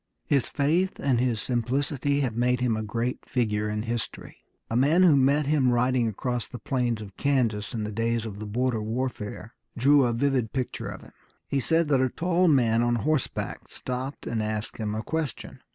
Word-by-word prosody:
His 140 -5 +2
faith 165 +6 0
and 130 -4 +2
his 120 -3 +1
simplicity 135 +4 0
have 125 -5 -1
made 125 +1 +2
him 125 -3 +1
a 110 - -2
great 115 +3 -2
figure 105 -4 -1
in 105 0 -2
history. 115 -1 -4 0.3
A 115 - -3
man 150 +9 +4
who 170 -5 +6
met 140 +2 +3
him 140 -3 +3
riding 125 0 +2
across 120 +3 -2
the 125 - -8
plains 120 -2 -1
of 100 -2 -12
Kansas 120 -7 0
in 110 - -2
the 105 - -3
days 115 +1 -1
of 105 -2 -6
the 110 - -6
border 120 +1 0
warfare 110 -1 -4 0.2
drew 140 +2 +5
a 120 - +1
vivid 125 -2 0
picture 130 -2 -3
of - - -7
him. - - -16 0.3
He 140 - 0
said 165 +4 +2
that 135 -3 +3
a 130 - +2
tall 180 +5 +1
man 120 -7 +4
on 120 0 +2
horseback 150 +3 -2
stopped 130 +2 -5
and 115 -1 -1
asked 110 0 -3
him 105 -2 -2
a 110 - -3
question. 160 -1 -4
125 Hz, 195 wpm, -26 LUFS, 115-140 Hz, 0.3 s, who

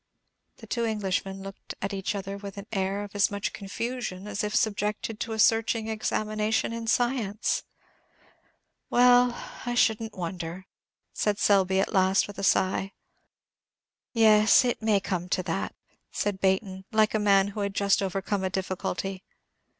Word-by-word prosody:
The - - -12
two 235 - -2
Englishmen 195 -3 -2
looked 195 0 -9
at 195 +1 -3
each 195 +1 -2
other 195 0 -4
with 200 0 -8
an 200 - -7
air 195 0 -1
of 205 - -9
as 205 -1 +3
much 200 0 -3
confusion 205 -1 -4
as 205 -1 -3
if 210 0 -2
subjected 210 +1 -1
to 225 - -3
a - - -4
searching 225 0 +3
examination 215 0 -1
in 230 0 -5
science. 235 -3 0 1.3
"Well, 245 0 +5 0.3
I 245 -1 -2
shouldn't 220 -2 +1
wonder," 175 0 -5 0.5
said 210 -1 0
Selby, 190 -2 +3
at 195 - 0
last, 190 0 +3
with 205 -1 -9
a - - -4
sigh. 195 0 +2 1.2
"Yes, 220 0 +5
it 245 - -1
may 220 -2 +3
come 180 -2 -3
to 185 - 0
that," 175 +2 -3 0.4
said 205 -2 -2
Baynton, 190 0 0
like 215 -1 +3
a 215 - +2
man 200 -1 +4
who 205 - -7
had 200 -1 -2
just 200 -1 +2
overcome 195 +1 -2
a 190 - 0
difficulty. 190 0 -3
200 Hz, 155 wpm, -27 LUFS, 195-220 Hz, 1.3 s, Well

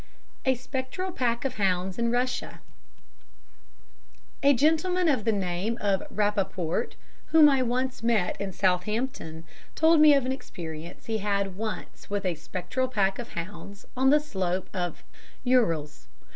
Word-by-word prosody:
A 260 0 +3
Spectral 260 +8 -4
Pack 235 -4 -1
of 260 -1 -2
Hounds 190 0 0
in 235 0 +1
Russia 250 +2 -1 1.8
A 280 - +6
gentleman 325 +6 +2
of 265 -9 +1
the 225 - +3
name 195 +3 -1
of 200 -2 +1
Rappaport 195 -2 -1 0.3
whom 320 -2 +7
I 270 -2 +4
once 255 +1 -1
met 225 -6 +1
in 200 -1 -3
Southampton 185 -2 -1 0.3
told 320 0 +5
me 300 -1 +8
of 275 -2 +1
an 260 - 0
experience 165 -10 -7
he 220 -1 -1
had 200 -2 -1
once 215 +1 -6
had - - -24
with 200 -1 -2
a 180 - +1
spectral 185 - -3
pack 195 -5 0
of 240 - -7
hounds 200 +3 -7
on 260 +1 +4
the 300 +2 +6
slope 190 -10 -3
of 175 -3 -3 0.4
the 250 - 0
Urals. 160 - +1
215 Hz, 150 wpm, -27 LUFS, 185-260 Hz, 1.8 s, me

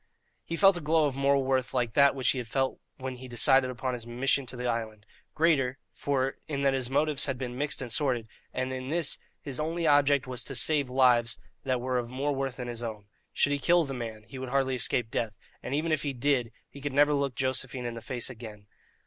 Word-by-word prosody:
He 165 - -4
felt 195 +1 +5
a - - -5
glow 155 +1 +3
of 140 - 0
moral 140 0 +2
worth 130 0 0
like 120 -3 0
that 140 +1 +5
which 130 -2 +2
he 130 - -2
had 120 - -5
felt 135 +4 -1 0.2
when 130 -1 -5
he 130 +1 -9
decided 130 +2 +4
upon 125 +1 -3
his 120 -1 -6
mission 130 +3 +1
to 125 - -3
the 125 0 -5
island 110 -3 -3 0.3
greater, 140 -5 +2 0.2
for 135 -1 -1
in 140 -3 -2
that 135 -1 +3
his 130 -2 -1
motives 145 +1 +2
had 135 -2 -2
been 125 -1 -5
mixed 145 0 -2
and 120 - -6
sordid, 125 -3 +1 0.2
and 130 0 -2
in 130 0 -5
this 165 -1 +1 0.2
his 140 -2 -6
only 165 +2 -1
object 145 -2 +4
was 130 -1 -2
to 135 - -3
save 140 +2 +4
lives 125 -3 +3 0.3
that 130 -2 +1
were 125 0 0
of 120 -1 -5
more 140 +3 -1
worth 135 -2 -2
than 125 -1 -6
his 120 -1 -5
own. 105 -3 -6 0.2
Should 145 - +2
he 145 - 0
kill 170 +4 +3
the 135 - -5
man, 115 -4 -6
he 120 +4 -10
would 130 -1 -5
hardly 135 0 +1
escape 120 -2 +1
death, 110 -3 -1 0.3
and 135 - -3
even 160 +2 0
if 155 - +1
he 145 -2 -2
did, 125 -2 +1 0.2
he 140 - -13
could 145 -1 -3
never 145 +1 +5
look 140 -3 0
Josephine 130 -1 -2
in 120 - -3
the 115 - -7
face 120 0 -3
again. 110 -4 -9
130 Hz, 235 wpm, -29 LUFS, 125-140 Hz, 0.3 s, felt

